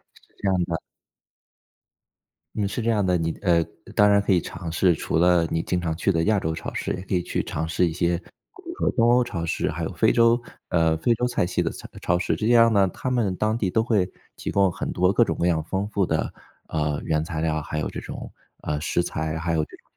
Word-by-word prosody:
是 - - -20 0.2
这 100 - -1
样 90 -2 +2
的。 85 -1 -3 1.8
嗯， 105 -2 0
是 110 +4 -3
这 115 - 0
样 105 -4 +2
的。 90 -1 +2
你 80 -1 -1
呃， 85 -4 +3 0.3
当 105 0 +6
然 100 0 +5
可 100 - 0
以 90 - +3
尝 80 - -6
试， 85 0 +3
除 - - -2
了 85 0 +4
你 80 - +1
经 90 - -1
常 80 -2 -2
去 85 - +1
的 80 0 +1
亚 105 +1 +3
洲 80 -3 -2
超 - - -6
市， - - -3
也 90 - -5
可 95 - -5
以 90 - +2
去 - - -2
尝 80 +2 -3
试 85 +2 +2
一 80 - -3
些 85 0 +1
比 90 - -13 0.4
如 340 - -6
说 - - +2
东 115 -1 +2
欧 125 0 +5
超 85 -8 -4
市， - - -1
还 - - -4
有 - - -3
非 - - +3
洲， 115 +1 +4 0.3
呃， 80 -2 +2
非 115 +9 +2
洲 125 +2 0
菜 120 - 0
系 90 0 -1
的 80 - 0
菜 - - -9
超 90 - +2
市。 90 - 0
这 110 - -2
样 115 -1 +6
呢， 100 -2 +4
他 130 +8 -4
们 105 -7 +1
当 110 +3 0
地 100 -5 0
都 110 +4 +2
会 100 -6 +1 0.2
提 - - -5
供 100 -2 +3
很 - - -4
多 90 +2 +2
各 120 - +5
种 - - -2
各 85 - +1
样 80 -3 +2
丰 95 +5 -2
富 100 -3 +1
的， 80 -1 -1 0.4
呃， 75 -2 -1
原 75 0 0
材 80 -2 -4
料， 80 -1 0
还 75 0 -4
有 75 - -1
这 - - -6
种， - - -8 0.3
呃， 75 0 -2
食 85 +2 0
材， 80 -2 -3
还 85 +1 -1
有 80 -1 +2
这 - - -15
个 - - -29
90 Hz, 275 characters per minute, -24 LUFS, 80-105 Hz, 1.8 s, 当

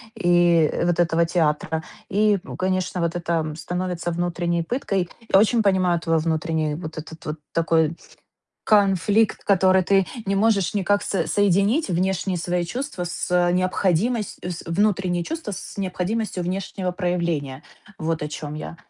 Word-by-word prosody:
и 175 -3 +4
вот 175 0 +1
этого 170 0 +2
театра. 160 -1 0 0.3
И, 210 0 +3
ну, - - -8
конечно, 185 -1 -1
вот 170 0 -1
это 165 -3 -1
становится 175 0 -3
внутренней 170 0 -1
пыткой. 195 -4 -1 0.2
Я - - +9
очень 225 +2 +3
понимаю 185 -4 +2
твой 165 0 +1
внутренний 160 -1 -1
вот 160 -1 -7
этот 160 +1 -9
вот 150 - -3 0.2
такой 165 0 +1 0.7
конфликт, 205 +1 +3
который 190 -1 +4
ты 195 0 +3 0.2
не 195 0 +1
можешь 205 -3 +2
никак 205 +1 +1
со 195 - -1
соединить 205 - +2
внешние 185 +1 0
свои 175 +1 -1
чувства 250 +1 -4
с 175 0 0
необходимос 185 +4 0
с 175 -2 -5
внутренние 180 -1 +1
чувства 325 -8 -5
с 195 - -7
необходимостью 190 +1 -2
внешнего 185 0 -3
проявления. 170 -6 -2 0.4
Вот 160 -1 -2
о 150 - -2
чем 150 0 -6
я. 155 +2 -7
180 Hz, 145 wpm, -23 LUFS, 165-195 Hz, 0.7 s, Я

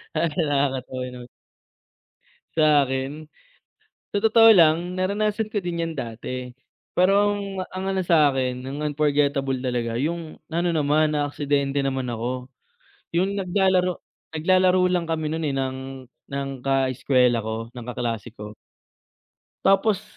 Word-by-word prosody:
Talagang 155 0 0
nakakatawa, 135 -2 -1
'no. 125 -1 -9 1.3
Sa 150 -3 +5
akin 135 +4 -4 0.9
sa 205 - 0
totoo 225 +1 +7
lang 170 -2 +4
naranasan 210 +3 0
ko 210 -3 -3
din 175 -1 -3
'yan 165 -1 -2
dati, 125 +1 -5 0.4
perong 200 0 +1
ang 185 +1 -5
ano 190 - +1
sa'kin, 135 -7 +2
ang 145 +3 -5
unforgettable 140 -2 +1
talaga 120 -2 -2
yung 160 +4 -3 0.2
ano 170 +2 0
naman, 150 0 +2
naaksidente 145 -1 0
naman 130 -3 -1
ako, 125 +3 -4 0.7
yung 190 +3 +2
naglalaro 185 -2 +1 0.4
naglalaro 185 +3 +3
lang 175 -2 0
kami 160 -2 -1
nun, 160 -1 -2
eh, 140 - -2
ng 130 0 -4 0.2
ng 140 0 -3
kaeskuwela 130 -2 +2
ko, 110 +1 -5
ng 120 -1 -9
kaklase 120 -3 -3
ko. 105 0 -8 1.1
Tapos, 195 +1 +3
145 Hz, 120 wpm, -24 LUFS, 130-180 Hz, 1.3 s, totoo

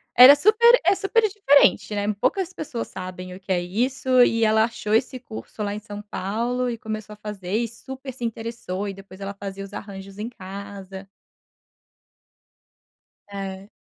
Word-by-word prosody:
Era 255 +4 +11
super 445 +9 +6
é - - +6
super 400 +4 +1
diferente, 285 - +4
né, 205 0 -1
poucas 370 - 0
pessoas 255 -9 -5
sabem 185 -1 -7
o 185 - -10
que 195 - -7
é 180 - +3
isso, 255 +7 +1
e 230 -1 +2
ela 220 0 +4
achou 225 -2 -4
esse 250 +3 +1
curso 220 -2 -8
lá 205 - -2
em 210 - -4
São 205 -1 -8
Paulo, 235 +6 -2
e 235 - -3
começou 215 -1 -6
a - - -10
fazer, 205 -3 -6
e 235 +1 +1
super 265 +3 -9
se 245 - -9
interessou, 225 -4 -4
e 200 - -4
depois 195 0 -13
ela 195 0 -4
fazia 195 -1 -7
os 195 0 -11
arranjos 195 -1 -8
em 220 +2 -3
casa. 195 -2 -9 2.2
É. 195 0 -6
215 Hz, 170 wpm, -24 LUFS, 195-250 Hz, 2.2 s, Era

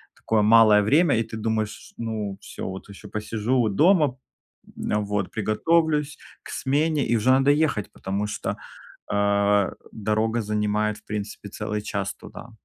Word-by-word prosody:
такое 110 -1 0
малое 110 -1 +6
время, 145 - +3
и 115 - +1
ты 110 0 -8
думаешь: 110 -1 -3
"Ну, 110 -4 -4
всё, - - -7
вот 95 +2 -7
ещё 100 +1 -11
посижу 110 +3 0
дома. 150 - +3 0.6
Н - - -4
а, 105 - +2
вот 105 -2 -2
приготовлюсь 150 +7 +1 0.3
к - - -11
смене"- 150 +2 0
и 120 - +2
уже 115 +3 +1
надо 135 +1 +4
ехать, 145 -8 0
потому 100 +2 -3
что, 105 - -4 0.5
а, 100 -1 +2 0.2
дорога 110 +2 0
занимает 105 0 -1
в - - -22
принципе 105 -1 -5
целый 105 0 -4
час 100 -2 -3
туда. 120 - -12
110 Hz, 150 wpm, -24 LUFS, 105-125 Hz, 0.6 s, малое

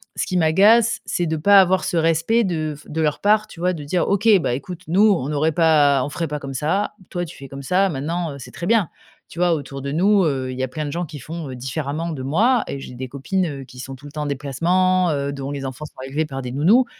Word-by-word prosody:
ce - - -1
qui 185 - -1
m'agace, 205 +8 +4
c'est 175 - -1
de 160 0 -1
pas 200 +5 +7
avoir 185 0 +2
ce 180 -2 -1
respect 165 +8 +2
de 160 -5 -2
f 150 - -16
de 160 - -4
leur 150 -1 0
part, 215 +1 +3
tu 185 - -13
vois, 180 +1 +1
de 155 -4 -6
dire: 170 +5 0
«OK, 200 +2 +1
bah 140 - -1
écoute, 175 +6 -7
nous, 195 +7 +4
on 155 -8 0
n'aurait 150 +2 +1
pas 150 -4 +4
on 145 - -3
ferait 165 +3 -3
pas 150 -1 -4
comme 135 -1 -7
ça, 160 +9 0 0.2
toi, 175 -1 -3
tu 160 - -12
fais 135 - -10
comme 135 +1 -8
ça 185 +7 +2
maintenant, 165 +3 -3
heu, - - -9
c'est 125 - -10
très 170 - -6
bien». 210 -3 +2 0.4
Tu 170 - -10
vois, 175 -1 +3
autour 140 -3 -5
de 140 +1 -4
nous, 195 +6 +3
heu, 135 -5 -1
il - - -8
y 130 - -1
a 130 - -2
plein 155 +4 -4
de 145 - -4
gens 175 +3 -2
qui 150 -1 -9
font, 155 +2 -7
heu, 130 - -6
différemment 145 +5 -3
de 135 -4 -6
moi 215 - +2
et 140 - -5
j'ai 135 - -9
des 130 +1 -6
copines, 180 +8 -1
heu, 140 -4 -5
qui 125 0 -14
sont 135 +1 -7
tout 130 +2 -16
le 145 - -9
temps 155 - -4
en - - -4
déplacement, 170 +6 +1
heu, 140 -1 -2
dont 140 0 -5
les 140 -1 -5
enfants 130 +3 -6
sont 150 - -14
élevés 150 +4 -1
par 135 -3 -6
des 125 -1 -5
nounous 195 - +4
155 Hz, 280 wpm, -21 LUFS, 140-180 Hz, 0.4 s, pas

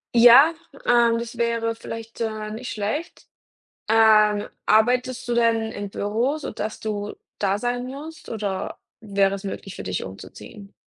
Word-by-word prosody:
Ja, 245 +7 +8 0.3
ähm, 235 -1 +4
das 235 0 -7
wäre 230 -1 0
vielleicht, 225 0 -8
äh, 215 -1 -3
nicht 230 +4 -6
schlecht. 220 - -4 0.6
Ähm, 215 -2 +5 0.2
arbeitest 250 +3 +2
du 240 - 0
denn 230 -1 +2
im 205 -2 -6
Büro, 230 +10 -1
so 305 - -6
dass 215 0 -5
du 210 -1 -4 0.2
da 200 -1 +1
sein 245 +2 -2
musst, 300 +5 -9
oder 200 -4 -3 0.2
wäre 200 -2 +1
es 195 - -9
möglich 195 -1 -6
für - - -7
dich 90 -1 -3
umzuziehen? 200 - -11
225 Hz, 150 wpm, -23 LUFS, 205-240 Hz, 0.6 s, Ja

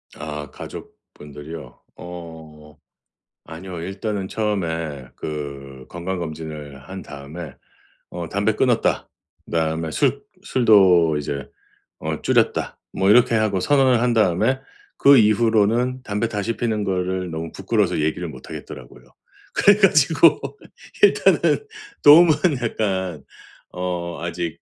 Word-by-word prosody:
아 75 -1 -6
가족분들이요? 75 +2 -11 0.2
어 80 -3 -11 0.7
아니요. 85 +1 -8
일단은 95 +2 -4
처음에 85 -10 -3
그 70 -3 -7
건강검진을 80 -5 -6
한 95 0 -7
다음에 75 +1 -9 0.6
어 - - -6
"담배 - - 0
끊었다." - - +1 0.4
그다음에 80 0 -1
"술 - - 0 0.2
술도 95 - +4
이제 70 -1 -4 0.5
어 - - -4
줄였다." - - 0
뭐 95 - +1
이렇게 120 +2 +5
하고 110 -3 +1
선언을 130 +1 +3
한 120 0 +2
다음에 110 +4 +2 0.4
그 140 0 +7
이후로는 115 +3 +2
담배 105 0 -2
다시 105 +2 -3
피우는 110 -3 -1
거를 95 -2 -2
너무 80 0 -5
부끄러워서 - - 0
얘기를 80 +3 -1
못 65 -4 -12
하겠더라고요. - - -10 0.5
그래 205 0 +5
가지고 160 -5 +4 0.6
일단은 430 +1 +3 0.4
도움은 160 +3 +8 0.3
약간 95 - -2 0.5
어 90 -2 -4
아직 85 -1 -4
90 Hz, 255 characters per minute, -21 LUFS, 80-110 Hz, 0.7 s, 도움은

